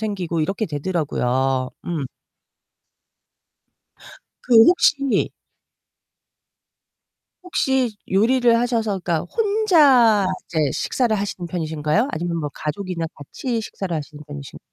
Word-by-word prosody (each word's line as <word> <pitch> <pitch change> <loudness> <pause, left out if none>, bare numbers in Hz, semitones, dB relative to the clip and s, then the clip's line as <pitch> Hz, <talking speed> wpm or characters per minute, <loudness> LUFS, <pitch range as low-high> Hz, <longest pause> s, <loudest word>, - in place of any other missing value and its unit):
생기고 185 -6 -2
이렇게 195 +7 -1
되더라고요. 135 -5 -1 0.2
음. 160 -6 -2 2.4
그 245 - +1
혹시 280 -6 +3 2.1
혹시 265 -9 0 0.2
요리를 235 +4 +3
하셔서 230 -3 0
그니까 170 -3 -1 0.2
혼자 300 - +4 0.2
이제 165 - -3
식사를 240 -4 0
하시는 195 -3 -4
편이신가요 160 - -1
아니면 170 0 -3
뭐 150 -2 -3
가족이나 165 +1 -4
같이 230 - -4
식사를 195 -4 -5
하시는 150 0 -8
편이신 145 -2 -9
190 Hz, 245 characters per minute, -21 LUFS, 155-240 Hz, 2.4 s, 혼자